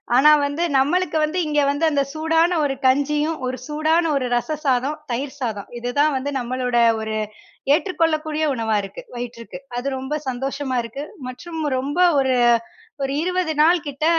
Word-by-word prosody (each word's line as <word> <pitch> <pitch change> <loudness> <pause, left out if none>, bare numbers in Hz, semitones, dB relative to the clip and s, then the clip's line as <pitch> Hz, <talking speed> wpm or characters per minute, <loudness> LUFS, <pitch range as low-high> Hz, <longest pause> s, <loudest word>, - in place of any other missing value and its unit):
ஆனா, 295 +4 +7
வந்து 285 +4 -2
நம்பளுக்கு 315 +4 +1
வந்து 310 +4 -1
இங்கே 295 -1 +2
வந்து 285 +3 0
அந்த 285 - +2
சூடான 325 +2 +2
ஒரு 280 -2 +1
கஞ்சியும், 295 +4 +2
ஒரு 255 0 -3
சூடான 315 +3 +1
ஒரு 270 -2 0
ரச 305 +6 -1
சாதம், 270 +3 +1
தயிர் 270 +4 -3
சாதம். 220 -6 -3
இதுதான் 285 +5 +1
வந்து 285 +2 -3
நம்பளோட 250 0 -1 0.2
ஒரு 220 0 -3 0.6
ஏற்றுக்கொள்ளக்கூடிய 315 -2 0
உணவா 225 -3 0
இருக்கு 195 0 -8
வயிற்றுக்கு. 240 0 -7 0.2
அது 245 +3 -3
ரொம்ப 265 +3 -3
சந்தோஷமா 270 +1 -3
இருக்கு. 250 +5 -6 0.3
மற்றும் 320 +6 -7 0.2
ரொம்ப 290 +6 -3 0.2
ஒரு 265 -1 +2 0.7
ஒரு 270 - -1
20 360 -2 0
நாள் 330 +4 +6
கிட்ட 285 +2 -3
285 Hz, 150 wpm, -22 LUFS, 255-315 Hz, 0.7 s, ஆனா